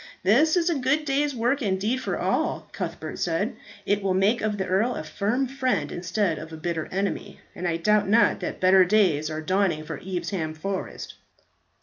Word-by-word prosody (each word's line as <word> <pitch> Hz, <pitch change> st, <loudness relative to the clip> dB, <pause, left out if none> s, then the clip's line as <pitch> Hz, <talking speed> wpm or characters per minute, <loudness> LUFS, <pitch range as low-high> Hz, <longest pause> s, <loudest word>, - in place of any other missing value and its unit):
"This 280 Hz, -, +4 dB
is 340 Hz, -1 st, +1 dB
a 335 Hz, -5 st, +1 dB
good 285 Hz, +4 st, +1 dB
day's 285 Hz, 0 st, 0 dB
work 245 Hz, +5 st, +1 dB
indeed 205 Hz, +3 st, 0 dB
for -, -, -2 dB
all," -, -, -1 dB
Cuthbert -, -, -5 dB
said; -, -, -1 dB, 0.3 s
"it 205 Hz, 0 st, +1 dB
will 190 Hz, -1 st, 0 dB
make 205 Hz, +6 st, +2 dB
of 210 Hz, -1 st, -1 dB
the 190 Hz, -, -1 dB
earl 195 Hz, +7 st, +1 dB
a -, -, -4 dB
firm 215 Hz, +11 st, -1 dB
friend 255 Hz, -, -1 dB
instead 180 Hz, 0 st, -1 dB
of 160 Hz, +1 st, -9 dB
a 160 Hz, -, -7 dB
bitter 160 Hz, 0 st, -3 dB
enemy; 200 Hz, +1 st, -3 dB
and 175 Hz, -, -4 dB
I 165 Hz, -1 st, 0 dB
doubt 210 Hz, +3 st, +2 dB
not 225 Hz, +3 st, +4 dB
that -, -, -4 dB
better 185 Hz, 0 st, +6 dB
days 180 Hz, -6 st, +2 dB
are 155 Hz, 0 st, -4 dB
dawning 185 Hz, -2 st, +1 dB
for -, -, -6 dB
Evesham 175 Hz, -3 st, -3 dB
Forest." 195 Hz, +4 st, -5 dB
195 Hz, 190 wpm, -25 LUFS, 175-235 Hz, 0.3 s, better